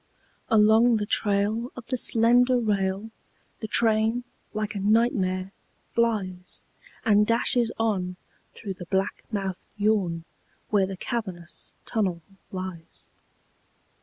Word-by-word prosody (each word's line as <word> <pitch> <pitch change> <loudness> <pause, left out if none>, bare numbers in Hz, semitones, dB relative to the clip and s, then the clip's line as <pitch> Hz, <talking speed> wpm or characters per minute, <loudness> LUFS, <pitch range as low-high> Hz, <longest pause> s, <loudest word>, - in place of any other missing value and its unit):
Along 220 +2 +5
the 210 - -1
trail 210 +3 +1
Of 255 - -9
the 255 - 0
slender 245 +1 +4
rail 205 -1 -1 0.5
The 220 - -4
train, 225 +2 +2 0.3
like 215 -1 -3
a 205 - -4
nightmare, 195 -3 +1 0.4
flies 195 -6 -1 0.4
And 210 -2 +4
dashes 235 0 +2
on 190 -5 0 0.4
Through 200 -3 -5
the 180 -2 -10
black 190 +1 -1
mouthed 195 -3 -3
yawn 200 -6 +1 0.5
Where 200 -3 +3
the 190 -1 -6
cavernous 185 -7 -5
tunnel 185 -7 -1 0.3
lies. 185 -3 -7
210 Hz, 110 wpm, -26 LUFS, 190-225 Hz, 0.5 s, Along